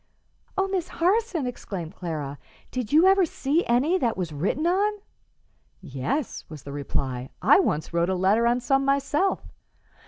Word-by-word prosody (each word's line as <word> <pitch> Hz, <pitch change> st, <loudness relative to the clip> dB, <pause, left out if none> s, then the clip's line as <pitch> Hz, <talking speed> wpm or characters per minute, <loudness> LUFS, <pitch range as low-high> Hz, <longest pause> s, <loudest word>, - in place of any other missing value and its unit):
"Oh, 385 Hz, 0 st, +2 dB
Miss 375 Hz, -3 st, -2 dB
Harson!" 370 Hz, -, +1 dB
exclaimed 195 Hz, -8 st, -5 dB
Clara; 150 Hz, -5 st, -5 dB, 0.3 s
"did 250 Hz, -4 st, -3 dB
you 315 Hz, +4 st, +6 dB
ever 385 Hz, 0 st, +6 dB
see 315 Hz, 0 st, 0 dB
any 280 Hz, +10 st, +2 dB
that 235 Hz, -, 0 dB
was 175 Hz, -4 st, -3 dB
written 190 Hz, -, -1 dB
on?" 395 Hz, +4 st, +2 dB, 0.9 s
"Yes," 180 Hz, -, -3 dB
was 155 Hz, -3 st, -10 dB
the 140 Hz, -, -8 dB
reply; 135 Hz, -3 st, -3 dB
"I 250 Hz, -, +6 dB
once 160 Hz, -, -1 dB
wrote 170 Hz, +1 st, +1 dB
a 190 Hz, -, +1 dB
letter 200 Hz, +6 st, +3 dB
on 240 Hz, +1 st, +2 dB
some 270 Hz, +2 st, +2 dB
myself." 280 Hz, +7 st, +1 dB
245 Hz, 155 wpm, -25 LUFS, -, 0.9 s, you